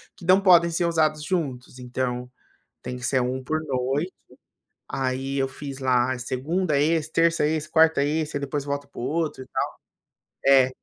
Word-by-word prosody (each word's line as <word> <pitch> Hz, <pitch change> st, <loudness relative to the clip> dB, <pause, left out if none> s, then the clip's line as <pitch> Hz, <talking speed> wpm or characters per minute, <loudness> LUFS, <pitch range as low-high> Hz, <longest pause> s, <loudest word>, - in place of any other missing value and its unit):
que 170 Hz, -, -12 dB
não 185 Hz, +2 st, +5 dB
podem 175 Hz, -3 st, +6 dB
ser 170 Hz, +1 st, 0 dB
usados 155 Hz, -2 st, +1 dB
juntos. 135 Hz, -8 st, -3 dB
Então, 125 Hz, 0 st, -3 dB, 0.5 s
tem 125 Hz, -, -5 dB
que 125 Hz, -, -11 dB
ser 130 Hz, 0 st, +2 dB
1 130 Hz, +1 st, -2 dB
por 155 Hz, +4 st, -1 dB
noite, 135 Hz, +6 st, -1 dB, 0.7 s
aí 135 Hz, +1 st, -2 dB
eu 135 Hz, -1 st, +1 dB
fiz 135 Hz, +1 st, -8 dB
lá: 130 Hz, -1 st, +2 dB
segunda 150 Hz, +6 st, -1 dB
esse, 160 Hz, +1 st, +1 dB
terça 165 Hz, -2 st, +3 dB
esse, 155 Hz, 0 st, -1 dB
quarta 160 Hz, -3 st, +4 dB
esse, 150 Hz, 0 st, -1 dB
depois 140 Hz, 0 st, -3 dB
volto 140 Hz, 0 st, -3 dB
pro -, -, -9 dB
outro 155 Hz, +1 st, -2 dB
e -, -, -20 dB
tal. -, -, -1 dB, 0.8 s
É, 135 Hz, -1 st, +6 dB
140 Hz, 165 wpm, -24 LUFS, 130-160 Hz, 0.8 s, podem